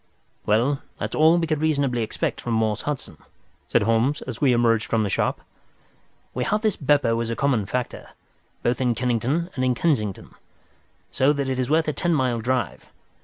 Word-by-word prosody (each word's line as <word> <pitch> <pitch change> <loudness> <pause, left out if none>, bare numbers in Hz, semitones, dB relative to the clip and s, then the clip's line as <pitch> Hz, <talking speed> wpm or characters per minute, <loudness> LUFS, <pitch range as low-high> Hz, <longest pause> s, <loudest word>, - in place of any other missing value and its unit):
"Well, 125 +7 +2 0.2
that's - - -4
all 160 +2 +5
we 170 - +1
could 155 -2 -1
reasonably 140 -6 +1
expect 110 - -2
from 120 - -3
Morse 110 -2 0
Hudson," 135 - -5 0.5
said - - +2
Holmes, 115 +6 +1
as 125 -3 -7
we 140 -3 +4
emerged 115 -2 +2
from 115 -1 +1
the 100 - -2
shop. - - 0 0.9
"We 125 - -1
have 210 +10 0
this 215 -4 +2
Beppo 140 -5 +2
as 115 - -3
a 115 - -2
common 125 -8 +1
factor, 125 -1 -4 0.5
both 120 +1 0
in 125 -2 +1
Kennington 125 - -1
and 130 - -1
in 125 -1 +2
Kensington, 110 - -1 0.8
so 135 +3 +3
that 140 -2 -2
is 130 -1 -1
worth 160 +1 +2
a 150 - 0
ten 170 +2 0
mile 125 -4 +1
drive. 115 - -2
130 Hz, 180 wpm, -23 LUFS, 115-145 Hz, 0.9 s, all